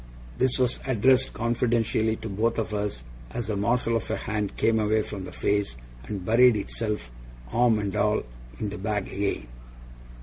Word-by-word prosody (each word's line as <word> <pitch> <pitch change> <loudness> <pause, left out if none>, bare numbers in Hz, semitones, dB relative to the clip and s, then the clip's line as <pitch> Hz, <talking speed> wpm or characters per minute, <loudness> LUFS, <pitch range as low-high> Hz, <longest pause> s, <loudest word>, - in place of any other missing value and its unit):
This 130 0 +3
was 125 -1 +1
addressed 130 +2 +4
confidentially 115 -2 +1
to 110 - -7
both 110 +4 0
of 110 -1 -2
us, 105 -12 -2 0.3
as 115 - -4
the 110 - -2
morsel 115 +3 +1
of - - -6
a 110 - 0
hand 105 -3 -3
came 110 0 +3
away 110 0 +2
from 100 -3 -6
the 90 - -8
face, 100 -12 0 0.3
and 95 +2 -5
buried 120 +2 +6
itself, 105 - -3 0.4
arm 120 -2 +4
and 100 -2 -2
all, - - +2 0.3
in 105 - -2
the 105 0 -6
bag 105 0 -1
again. 100 -10 -2
110 Hz, 170 wpm, -26 LUFS, 100-115 Hz, 0.4 s, buried